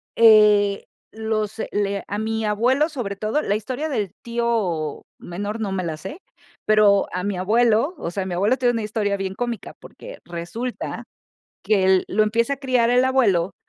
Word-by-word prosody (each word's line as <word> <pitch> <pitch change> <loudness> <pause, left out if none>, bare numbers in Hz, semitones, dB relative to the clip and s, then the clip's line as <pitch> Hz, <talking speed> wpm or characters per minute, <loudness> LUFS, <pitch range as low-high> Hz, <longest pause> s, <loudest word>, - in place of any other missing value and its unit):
eh, 210 -3 +5 0.3
los 220 -1 -2 0.2
le 200 -1 -1
a 205 - -3
mi 220 0 -2
abuelo, 245 +8 +2
sobre 240 -10 -4
todo, 215 +9 -1
la 205 - 0
historia 255 +8 -4
del 205 - -2
tío 225 -10 -2 0.2
menor 205 +5 -5
no 205 -3 -2
me 185 -1 -2
la 160 -2 -4
sé, 190 - -9 0.4
pero 210 -2 +4
a 180 - -2
mi 200 0 -2
abuelo, 230 - +2
o 170 - -5
sea, 190 +1 -3
mi 180 - -4
abuelo 205 +8 +2
tiene 245 -2 +2
una 225 -2 -2
historia 210 -2 -1
bien 190 -1 -4
cómica 240 -1 -4
porque, - - -12
resulta 175 +9 -5 0.6
que 200 -3 +2
l 190 -1 +4
lo 215 +3 +2
empieza 230 +5 +1
a - - -7
criar 255 -3 +1
el 250 +1 +4
abuelo 200 -9 +2
215 Hz, 175 wpm, -22 LUFS, 195-235 Hz, 0.6 s, eh